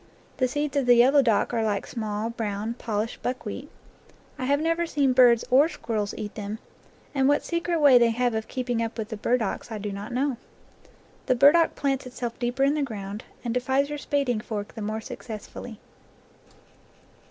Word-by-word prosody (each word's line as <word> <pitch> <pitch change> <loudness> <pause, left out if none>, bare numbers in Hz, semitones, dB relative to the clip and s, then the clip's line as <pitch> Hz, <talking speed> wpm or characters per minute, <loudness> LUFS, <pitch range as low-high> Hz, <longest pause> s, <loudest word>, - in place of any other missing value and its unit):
The 255 - +2
seeds 290 +2 -2
of 270 -3 +1
the 245 - +7
yellow 265 +4 +6
dock 230 -2 +1
are 230 -1 +1
like 205 -2 -1
small, 220 -1 -3
brown, 215 -1 -3
polished 225 -1 -3
buck 255 0 -3
wheat. 260 +7 -6 0.7
I 255 - -2
have 285 +2 +2
never 330 +2 0
seen 280 -5 +2
birds 245 -2 +5
or 280 +5 +6
squirrels 220 -9 -3
eat 205 -1 -5
them, 210 0 -5 0.6
and 265 -2 +2
what 290 +1 +2
secret 340 0 -1
way 280 -4 +7
they 235 -1 +4
have 245 +1 0
of 220 0 -3
keeping 245 -2 -2
up 230 +1 -3
with 220 -1 -4
the 220 - -4
burdocks 235 +1 -1
I 220 - -3
do 205 0 -4
not 200 +3 -6
know. 260 +1 0 0.9
The 255 - +3
burdock 295 +6 +5
plants 270 -2 -1
it 250 - -11
self 240 -2 -5
deeper 245 +2 0
in 280 +1 +4
the 300 - 0
ground, 210 -5 -5 0.2
and 235 - -1
defies 265 +3 +1
your 295 0 -4
spading 280 -6 0
fork 210 -3 -5
the 225 - -7
more 215 +1 -3
successfully. 220 0 -8
245 Hz, 190 wpm, -26 LUFS, 220-275 Hz, 0.9 s, the